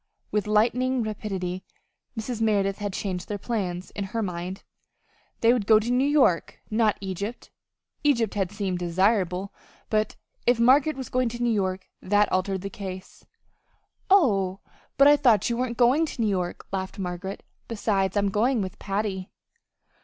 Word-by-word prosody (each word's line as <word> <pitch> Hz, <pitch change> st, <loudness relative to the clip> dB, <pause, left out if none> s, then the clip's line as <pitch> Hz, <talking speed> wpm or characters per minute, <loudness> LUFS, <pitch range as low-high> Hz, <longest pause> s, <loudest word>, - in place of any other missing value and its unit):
With 210 Hz, 0 st, 0 dB
lightning 245 Hz, +4 st, +2 dB
rapidity 190 Hz, -4 st, -4 dB, 0.6 s
Mrs. 225 Hz, 0 st, -4 dB
Merideth 200 Hz, -3 st, +1 dB
had 205 Hz, -1 st, -3 dB
changed 185 Hz, -2 st, -4 dB
their 205 Hz, -, -2 dB
plans 190 Hz, -5 st, -3 dB
in 200 Hz, -, -4 dB
her 225 Hz, +3 st, -3 dB
mind. 180 Hz, 0 st, -5 dB, 0.8 s
They 230 Hz, +1 st, +5 dB
would 220 Hz, -5 st, -1 dB
go 220 Hz, -, +7 dB
to 220 Hz, +3 st, -1 dB
New 255 Hz, +3 st, +3 dB
York, 270 Hz, -, +2 dB
not 215 Hz, -1 st, +2 dB
Egypt. 200 Hz, +4 st, -5 dB, 0.5 s
Egypt 235 Hz, -8 st, +2 dB
had 195 Hz, -3 st, -1 dB
seemed 195 Hz, -3 st, -2 dB
desirable, 185 Hz, +1 st, +1 dB, 0.4 s
but 215 Hz, 0 st, +1 dB, 0.3 s
if 245 Hz, -1 st, +4 dB
Margaret 270 Hz, +6 st, +4 dB
was 260 Hz, -3 st, -6 dB
going 255 Hz, -1 st, +1 dB
to 240 Hz, +1 st, -4 dB
New 240 Hz, -1 st, +2 dB
York, 190 Hz, -2 st, -1 dB
that 205 Hz, +2 st, +2 dB
altered 190 Hz, 0 st, 0 dB
the 195 Hz, -, -5 dB
case. 190 Hz, -2 st, -8 dB, 0.8 s
"Oh, 200 Hz, -, +3 dB, 0.4 s
but 275 Hz, +1 st, +7 dB
I 290 Hz, -, +8 dB
thought 240 Hz, -7 st, +3 dB
you 235 Hz, -, -1 dB
weren't 240 Hz, -1 st, -2 dB
going 260 Hz, +7 st, +4 dB
to 250 Hz, -, -5 dB
New 215 Hz, -, +2 dB
York," 180 Hz, -3 st, -2 dB
laughed 190 Hz, -1 st, -4 dB
Margaret. 190 Hz, 0 st, -5 dB, 0.2 s
"Besides 205 Hz, -3 st, 0 dB
I'm 200 Hz, 0 st, +2 dB
going 235 Hz, +5 st, +2 dB
with 190 Hz, -1 st, -4 dB
Patty." 195 Hz, -2 st, -3 dB
205 Hz, 160 wpm, -26 LUFS, 190-235 Hz, 0.8 s, I